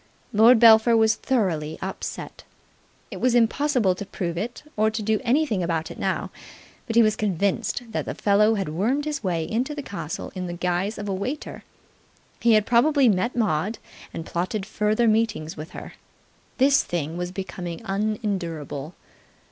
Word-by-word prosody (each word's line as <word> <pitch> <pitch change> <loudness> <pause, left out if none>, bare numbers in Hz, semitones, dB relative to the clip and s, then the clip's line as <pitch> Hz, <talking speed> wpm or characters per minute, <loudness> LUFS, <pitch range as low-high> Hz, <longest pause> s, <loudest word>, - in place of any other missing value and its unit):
Lord 225 +4 +7
Belpher 225 0 +7
was 220 0 +4
thoroughly 170 - -1
upset. 190 - -6 0.7
It 190 -3 -7
was 250 0 +3
impossible 240 -3 +2
to 185 - -6
prove 180 -3 -4
it 225 +8 -5
or 215 +1 +3
to 220 0 -4
do 215 0 +1
anything 245 -5 +1
about 165 -2 -2
it - - -10
now, - - -2 0.6
but 225 - -3
he 235 - +7
was 215 -1 +2
convinced 200 +3 -1
that - - -2
the - - -4
fellow 210 +2 +3
had 195 -6 -2
wormed 230 - 0
his 295 -4 -3
way 170 -4 0
into 255 +7 -2
the 290 - -5
castle 165 - -6
in 185 -1 -4
the 175 - -5
guise 180 +4 -1
of 210 -1 -5
a 195 - -1
waiter. 250 +11 -5 0.8
He 235 -1 +4
had 215 -1 +4
probably 265 +3 +4
met 220 +5 0
Maud 210 -2 0 0.3
and 165 - -6
plotted 185 +5 -3
further 215 +2 +1
meetings 215 -7 0
with 155 +2 -8
her. - - -9 0.6
This 275 +2 +5
thing 165 -2 -3
was 175 0 -4
becoming 180 -3 -6
unendurable. 190 - -3
210 Hz, 165 wpm, -24 LUFS, 180-230 Hz, 0.8 s, Lord